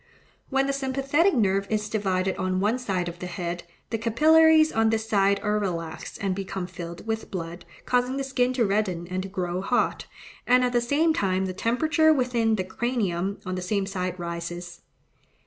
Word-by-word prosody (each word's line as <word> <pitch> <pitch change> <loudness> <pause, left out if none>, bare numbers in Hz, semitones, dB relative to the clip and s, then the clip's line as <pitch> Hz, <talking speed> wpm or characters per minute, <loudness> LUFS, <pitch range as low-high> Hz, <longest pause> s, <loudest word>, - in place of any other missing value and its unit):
When 270 0 +2
the 275 - 0
sympathetic 275 +6 +1
nerve 195 -3 +2
is 215 -1 -1
divided 190 -3 0
on 185 -1 -1
one 215 +6 +1
side 190 -8 -2
of 175 0 -7
the 180 - -5
head, 175 -1 -4 0.3
the 225 - -1
capillaries 315 +7 +5
on 225 0 +2
this 220 0 -1
side 200 -2 +3
are 210 0 +1
relaxed 170 -5 -4
and 195 -3 0
become 190 -1 -4
filled 170 0 -8
with 225 0 -3
blood, 175 -2 -6 0.2
causing 250 +1 +1
the 275 - -1
skin 255 -2 +1
to 245 -3 +2
redden 195 -4 0
and 185 0 -1
to 195 - -6
grow 180 -1 -2
hot, 245 +5 0 0.4
and 250 +1 +5
at 250 0 0
the 240 - +3
same 300 +7 +2
time 190 -6 0
the 185 - -3
temperature 310 - +2
within 245 -5 +2
the 190 - -1
cranium 195 -3 -2
on 185 - -3
the 185 - -3
same 195 +2 -1
side 185 -2 -3
rises. 170 0 -6
200 Hz, 185 wpm, -26 LUFS, 185-250 Hz, 0.4 s, capillaries